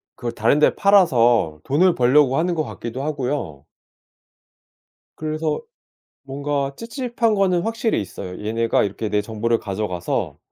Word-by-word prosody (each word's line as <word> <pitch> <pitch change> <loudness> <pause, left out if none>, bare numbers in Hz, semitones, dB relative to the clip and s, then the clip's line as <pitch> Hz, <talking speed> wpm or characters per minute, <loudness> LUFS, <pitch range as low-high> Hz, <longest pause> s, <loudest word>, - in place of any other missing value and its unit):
그걸 120 -2 -4
다른 115 +7 +2
데 - - +4
팔아서 120 - +3
돈을 170 +6 +3
벌려고 135 +2 +4
하는 175 +1 0
것 155 - 0
같기도 130 -1 -6
하고요. 145 -2 -3 1.5
그래서 155 - -2 0.6
뭔가 140 0 -3
찝찝한 235 -1 -1
거는 185 -3 +2
확실히 225 - -1
있어요. 95 -2 -7
얘네가 115 0 +1
이렇게 105 +2 -3
내 105 0 0
정보를 115 +2 -1
가져가서 95 -3 -3
140 Hz, 295 characters per minute, -21 LUFS, 115-170 Hz, 1.5 s, 데